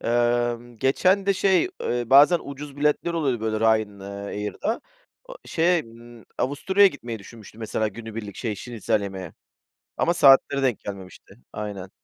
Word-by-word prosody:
Emm, 120 0 0
geçen 185 - +2
de 200 - +4
şey, 190 - +2
eee, 120 0 -1
bazen 145 +6 +7
ucuz 140 0 -8
biletler 150 +4 +1
oluyor 135 -8 0
böyle 110 -1 -2
Ryan 110 -3 +1
eee, 95 - -9
Air'da 105 - -4 0.4
o - - -11
şeye, 170 0 +2
ımm, 115 0 -15
Avusturya'ya 190 +9 +3
gitmeyi 120 -8 -7
düşünmüştüm 110 +1 -14
mesela 110 -1 -1
günübirlik, 110 -1 -8
şey, 110 -3 -3
şnitzel 110 -1 -2
yemeye 95 -3 -6 0.7
ama 170 - +2
saatleri 140 -3 +5
denk 125 -5 +1
gelmemişti. 95 -3 -10 0.2
Aynen. 100 -3 -6
120 Hz, 145 wpm, -24 LUFS, 105-145 Hz, 0.7 s, bazen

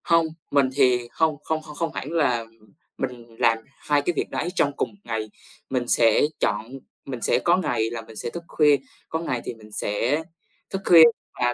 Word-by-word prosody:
Hông, 165 -1 +4 0.3
mình 140 -2 +4
thì 125 -3 +3
hông 160 -2 +1
không 160 0 -1
không 155 -1 -11
không 165 +1 -2
hẳn 145 - -5
là 125 -8 +1 0.5
mình 120 -3 -6
làm 115 0 +4 0.2
hai 145 -1 +1
cái 175 +5 0
việc - - -2
đấy 175 - -2
trong 145 -4 +2
cùng - - 0
một - - -20
ngày, 110 -2 -3 0.4
mình 125 -2 -1
sẽ 115 -2 +4 0.2
chọn 110 +3 -1 0.3
mình 125 -3 -6
sẽ - - +2
có 175 +1 +3
ngày 120 -11 0
là 115 0 -5
mình 115 0 -14
sẽ - - -4
thức 170 +7 -7
khuya, 150 -2 +4 0.3
có 160 - -1
ngày 130 -7 -2
thì - - -4
mình 110 -2 -16
sẽ 120 +9 0 0.5
thức 195 - -3
khuya 165 -2 +9 0.4
và 120 0 +2
130 Hz, 205 wpm, -24 LUFS, 115-160 Hz, 0.5 s, khuya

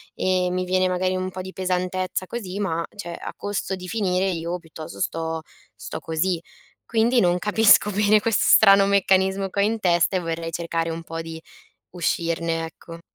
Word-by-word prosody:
e 185 -1 +1
mi 185 0 -1
viene 185 0 +2
magari 185 +1 0
un 185 0 -3
po' 185 - -6
di 190 +1 -8
pesantezza 185 0 -2
così, 200 -4 -5
ma 170 -4 -1
cioè, 175 -4 -6
a - - -7
costo 205 -1 -3
di 180 0 -9
finire 190 -3 0
io 170 0 -3
piuttosto 155 - -10
sto 160 0 -2 0.3
sto - - -7
così. 165 +2 -1 0.5
Quindi, 235 +2 +2
non 175 0 +2
capisco 210 0 +5
bene 210 +1 +3
questo 225 -2 +1
strano 195 -2 +7
meccanismo 195 0 +2
che 200 - -4
ho - - +4
in 220 +1 0
testa, 175 0 +2
e - - 0
vorrei 165 0 -4
cercare 165 0 -2
un 165 +1 -5
po' 165 0 -6
di 165 0 -8 0.5
uscirne, 165 -1 -1
ecco. 165 +1 -12
185 Hz, 180 wpm, -23 LUFS, 165-195 Hz, 0.5 s, strano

